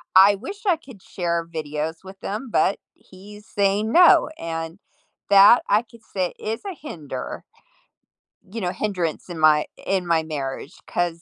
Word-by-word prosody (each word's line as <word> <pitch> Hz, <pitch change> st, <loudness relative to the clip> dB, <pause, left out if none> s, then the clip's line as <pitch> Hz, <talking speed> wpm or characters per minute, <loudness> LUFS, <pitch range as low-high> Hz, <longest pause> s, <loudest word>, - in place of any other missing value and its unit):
I 195 Hz, +2 st, +8 dB
wish 330 Hz, -, -8 dB
I 360 Hz, -5 st, +3 dB
could 260 Hz, -, -15 dB
share 170 Hz, -2 st, -2 dB
videos 155 Hz, +1 st, -3 dB
with 190 Hz, +1 st, -11 dB
him 220 Hz, +5 st, -4 dB
but 195 Hz, -, +2 dB, 0.2 s
he's 205 Hz, +3 st, -15 dB
saying 205 Hz, +2 st, 0 dB
no, 355 Hz, -1 st, +6 dB
and 165 Hz, +2 st, -5 dB, 0.5 s
that, 200 Hz, +4 st, +8 dB
I 210 Hz, +2 st, +4 dB
could 230 Hz, -1 st, -19 dB
say, 185 Hz, -2 st, -1 dB
is 220 Hz, +1 st, -4 dB
a 390 Hz, -, -4 dB
hinder 155 Hz, -, -7 dB, 1.1 s
you 230 Hz, -, -5 dB
know 180 Hz, -2 st, -1 dB
hindrance 180 Hz, -6 st, -3 dB
in 170 Hz, -, -6 dB
my 155 Hz, -1 st, +5 dB, 0.2 s
in 190 Hz, -2 st, 0 dB
my 165 Hz, -2 st, +2 dB
marriage 145 Hz, 0 st, -5 dB
'cause 170 Hz, -1 st, -2 dB
190 Hz, 155 wpm, -23 LUFS, 165-215 Hz, 1.1 s, I